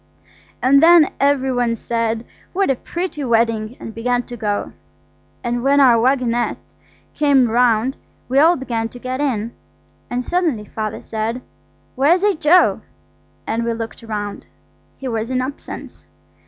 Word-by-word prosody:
And 275 +2 +5
then 330 -2 +6
every 275 -1 +2
one 240 -2 +1
said, 230 0 -2 0.3
"What 385 -5 +2
a - - +1
pretty 340 +2 -5
wedding!" 230 -1 0
and 225 - -8
began 245 +2 -1
to 245 - -9
go. 210 -3 -3 0.7
And 240 0 -1
when 280 +1 +4
our 245 -4 +6
waggonette 245 -2 +1 0.6
came 280 -4 +3
round 240 +1 +2 0.3
we 265 +2 +2
all 330 +4 +6
began 235 -5 -3
to 245 - -12
get 255 +2 -4
in. 235 -5 -1 0.6
And 245 0 -2
suddenly 325 -12 0
Father 215 0 -5
said– 225 +3 -3 0.5
"Where's 315 +8 +3
H.O.?" 360 -3 +4 0.6
And 230 +1 -1
we 230 0 -1
looked 225 0 -6
round. 210 -3 -5 0.5
He 270 - -6
was 225 -1 -2
in 255 -1 0
absence. 265 +3 -7
245 Hz, 140 wpm, -19 LUFS, 230-275 Hz, 0.7 s, then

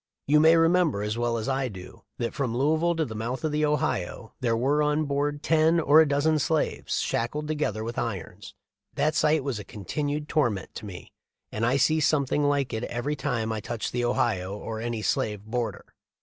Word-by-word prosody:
You 150 +2 +4
may 160 +2 +6
remember, 165 - +3
as 105 +1 -2
I - - -5
well 120 +3 -1
do, 95 -4 -11 0.2
that 115 -1 -2
from 125 -5 -2
Louisville 160 +5 +2
to 160 -1 0
the 110 - -7
mouth 115 +6 -4
of 155 - 0
the 150 +1 0
Ohio, 120 -8 -1
there 115 -2 +1
were 140 +5 +2
on 150 +1 +1
board 145 +1 -1
ten 160 +1 +3
or 155 0 +6
a 160 - +3
dozen 150 +2 +2
slaves 155 +2 0
shackled 150 +6 -2
together 150 -9 -1
with 115 +1 -4
irons. 100 -2 -5 0.4
That 155 +1 +1
sight 150 -1 +2
was 130 -6 -2
a - - -6
continued 145 - -4
torment 120 - 0
to 105 - -7
me; 90 -3 -10 0.4
and 110 - -3
I 125 +4 +3
see 155 +3 +3
something 145 -1 +2
like 140 -2 +1
it 110 +1 -2
every 135 +5 -2
time 125 -5 -2
I 110 - -2
touch 115 +2 -4
the 120 0 -1
Ohio 100 -6 0
or 110 +1 -5
any 115 -2 -3
slave 105 -2 -1
border. 120 +1 -3
135 Hz, 195 wpm, -26 LUFS, 115-150 Hz, 0.4 s, may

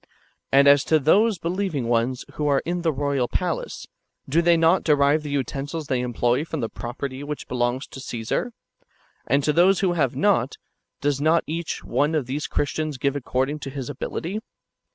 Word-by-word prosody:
And 140 +1 +6
as 140 -1 +6
to 160 - +4
those 200 +9 +3
believing 170 -6 -2
ones 120 +2 0
who 150 - -2
are 140 -1 +2
in 175 +1 -2
the 165 -1 +1
royal 140 -3 0
palace, 175 +3 -3 0.4
do 160 +5 +3
they 170 0 +4
not 165 +3 +3
derive 145 0 +3
the 150 - -6
utensils 140 +3 -3
they 130 -2 0
employ 120 +2 0
from 160 -1 -5
the 115 -3 -2
property 130 +3 -6
which 150 0 -6
belongs 125 +2 -1
to - - -9
Csesar; 120 - -3 0.8
and 140 +3 +2
to 150 - +2
those 180 +4 +4
who 185 -3 +2
have 140 -7 0
not, 190 - +1 0.4
does 145 -1 0
not 160 +2 +3
each 165 +1 -4
one 150 +3 +1
of 150 -5 0
these 140 +4 -3
[Christians] 155 0 -2
give 140 +1 0
according 135 +2 -1
to 140 - -6
his 135 0 -5
ability? 170 +8 -4
145 Hz, 180 wpm, -24 LUFS, 130-165 Hz, 0.8 s, And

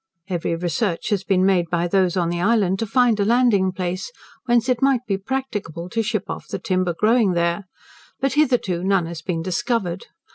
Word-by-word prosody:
Every 170 -2 -1
research 175 +2 -2
has 200 -2 +1
been 190 -2 +2
made 180 -3 +2
by 175 0 0
those 185 0 +1
on 170 -2 +1
the 175 0 -2
island 195 -2 +2
to 225 - -2
find 240 -1 +3
a - - +3
landing 220 -4 +3
place, 185 - -4 0.3
whence 240 -1 +2
it 250 -2 +1
might 270 -3 +3
be 200 - 0
practicable 195 - -4
to 225 - 0
ship 215 -2 -2
off - - -6
the - - -4
timber 185 -2 -1
growing 220 -3 +3
there, 170 +3 0 0.5
but 275 - 0
hitherto 245 - +1
none 195 -2 +2
has 165 -1 -7
been 165 -1 -3
discovered. 185 0 -2
190 Hz, 190 wpm, -22 LUFS, 175-230 Hz, 0.5 s, find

